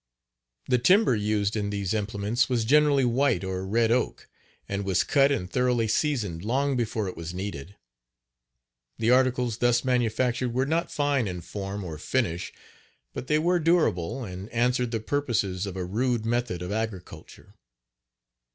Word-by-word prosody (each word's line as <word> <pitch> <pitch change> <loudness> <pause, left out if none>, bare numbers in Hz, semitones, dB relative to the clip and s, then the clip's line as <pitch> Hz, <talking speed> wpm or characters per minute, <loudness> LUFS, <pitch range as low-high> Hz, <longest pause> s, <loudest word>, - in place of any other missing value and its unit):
The 125 - +3
timber 180 - +4
used 105 0 0
in 105 -2 -1
these 100 -2 -2
implements 110 +4 0
was 120 -3 0
generally 145 +1 +4
white 125 -5 +1
or 95 0 -3
red 115 +2 +2
oak, 125 0 -1 0.4
and 100 0 -3
was 95 -2 +1
cut 140 -1 +3
and 90 -10 -1
thoroughly 125 +2 +1
seasoned 105 - -1
long 135 +5 0
before 110 -3 -1
it 90 - -5
was 85 +1 -7
nedeed. 95 -2 -6 1.2
The 115 +2 +2
articles 125 -3 +2
thus 120 0 +2
manufactured 125 0 0
were 130 +1 +2
not 165 +4 -1
fine 145 -6 +1
in 90 -2 -5
form 100 +2 -5
or 80 -4 -7
finish, 90 -5 -1 0.6
but 130 - -6
they 150 - +3
were 175 +3 +2
durable, 135 - +1
and 95 0 -7
answered 125 +1 +1
the 115 -1 -2
purposes 110 -7 -1
of 95 -1 -6
a 90 - -3
rude 115 +4 -1
method 115 -6 -1
of 90 - -5
agriculture. 110 -4 -6
115 Hz, 155 wpm, -26 LUFS, 100-130 Hz, 1.2 s, timber